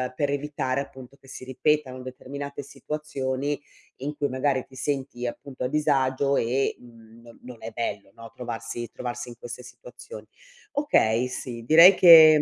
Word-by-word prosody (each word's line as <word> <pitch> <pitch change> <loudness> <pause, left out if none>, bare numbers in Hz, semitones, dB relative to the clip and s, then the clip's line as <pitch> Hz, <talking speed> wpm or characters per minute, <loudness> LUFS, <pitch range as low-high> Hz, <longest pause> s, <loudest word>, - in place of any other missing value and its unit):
per 145 0 0
evitare 140 -2 -2
appunto 130 -1 -11
che - - -19
si 130 - -9
ripetano 130 -1 0
determinate 140 +2 -7
situazioni, 140 -1 -4 0.4
in 145 +3 -5
cui 145 - 0
magari 130 0 0
ti 130 - -17
senti, 135 -3 -3
appunto, 130 +2 -7
a - - +1
disagio 140 -2 +1
e, 130 +3 0
mhmm, 115 -2 -17
no 115 -1 -15
non 125 -2 -10
è 110 - -6
bello, 105 -4 -4
no, 115 0 -11
trovarsi 120 -1 -5
trovarsi 120 0 -5
in 120 - -10
queste 120 +1 -8
situazioni. 125 - -12 0.5
Okay, 125 - +2
sì, 120 -2 -6
direi 165 +6 +9
che 160 -4 +9
130 Hz, 155 wpm, -25 LUFS, 120-145 Hz, 0.5 s, direi